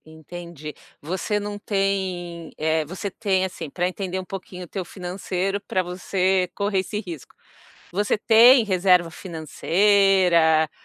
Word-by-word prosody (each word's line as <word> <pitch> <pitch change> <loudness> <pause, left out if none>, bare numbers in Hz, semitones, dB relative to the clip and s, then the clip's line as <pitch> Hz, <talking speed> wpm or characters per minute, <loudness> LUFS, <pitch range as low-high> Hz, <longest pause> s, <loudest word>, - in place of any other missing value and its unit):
Entendi. 160 -1 -9 0.3
Você 185 +6 -2
não 205 0 -5
tem 185 -5 -2
eh, 160 +1 +1
você 185 +5 -5
tem, 190 -3 0
assim, 170 -4 -6
pra 180 +5 -1
entender 185 0 -4
um 185 - -7
pouquinho 185 -1 -8
o - - -10
teu 190 +2 -4
financeiro 185 +2 -3
pra 185 -2 -1
você 185 +1 0
correr 200 -1 0
esse 205 +3 -3
risco. 170 - -9 0.6
Você 205 +3 +1
tem 230 +3 +6
reserva 180 -3 +3
financeira, 170 -1 +2
185 Hz, 135 wpm, -23 LUFS, 170-195 Hz, 0.6 s, tem